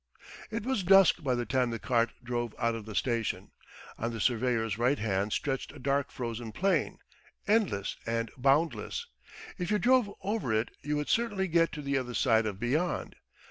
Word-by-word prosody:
It 220 -1 -3
was 260 -5 0
dusk 195 -1 +6
by 130 -4 +1
the 120 0 -2
time 130 -1 +1
the 115 - -3
cart 115 0 +1
drove 120 -2 -3
out 115 -1 +1
of 115 -2 -6
the 105 - -7
station. 115 -2 -1 0.5
On 115 - -1
the 115 - -5
surveyor's 115 -2 +1
right 125 +4 +3
hand 100 -1 -1
stretched 135 +3 -2
a - - -11
dark 140 +1 0
frozen 115 -2 -5
plain, 195 +1 +1 0.5
endless 200 - +1
and 115 0 -1
boundless. 150 - +1 0.5
If 180 - -2
you 210 - +3
drove 245 +1 +3
over 205 - -1
it 110 +2 0
you 150 +1 -2
would 150 0 -2
certainly 225 -5 +1
get 165 -1 +3
to 150 - -6
the 140 -1 +1
other 125 -2 -5
side 110 -1 +3
of 100 -2 -4
beyond. 150 +10 -1
130 Hz, 180 wpm, -30 LUFS, 115-175 Hz, 0.5 s, dusk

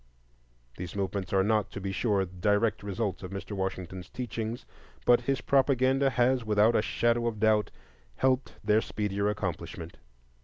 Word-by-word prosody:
These 90 0 -6
movements 100 0 -2
are 95 -1 +3
not, 105 0 +1
to - - -5
be 95 0 -3
sure, 100 -1 +1
direct 105 +4 +1
results 100 0 -3
of 95 - -6
Mr. 100 +2 -7
Washington's 95 -2 -4
teachings; 115 -1 -4 0.4
but 120 0 +5
his 135 +1 -1
propaganda 135 0 +3
has, 125 0 +2
without 110 +1 +3
a - - +4
shadow 120 +2 +1
of 110 -2 -3
doubt, 110 -1 +3 0.5
helped 130 - +1
their 105 +1 +3
speedier 105 -1 -1
accomplishment. 85 -4 -4
105 Hz, 150 wpm, -29 LUFS, 95-120 Hz, 0.5 s, but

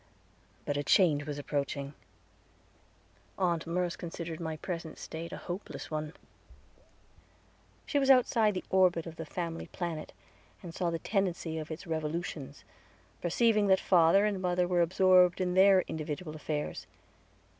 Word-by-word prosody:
But 145 - -1
a 145 - -1
change 145 -3 +3
was 145 -1 -4
approaching. 140 -1 -3 1.4
Aunt 170 -4 0
Merce 175 0 -1
considered 165 -1 -6
my 160 -2 -4
present 165 -2 -6
state 165 +1 -7
a - - -6
hopeless 180 -1 -7
one. 155 0 -3 1.7
She 285 - +1
was 270 -1 +1
outside 230 -5 +4
the 185 - -3
orbit 180 -3 +3
of 165 -1 -9
the 160 - -6
family 165 0 -4
planet, 165 -3 -5 0.5
and 170 -2 -8
saw 175 0 -1
the 165 - -1
tendency 175 -4 -1
of 155 - -7
its 160 +1 -7
revolutions, 155 -3 -4 0.6
perceiving 210 +4 +2
that 190 -1 +5
father 180 +3 +4
and 200 -3 -1
mother 180 -1 +1
were 175 -1 +2
absorbed 180 +1 +4
in 180 -1 0
their 190 0 +6
individual 155 +1 -5
affairs. 150 - -4
170 Hz, 140 wpm, -30 LUFS, 155-185 Hz, 1.7 s, their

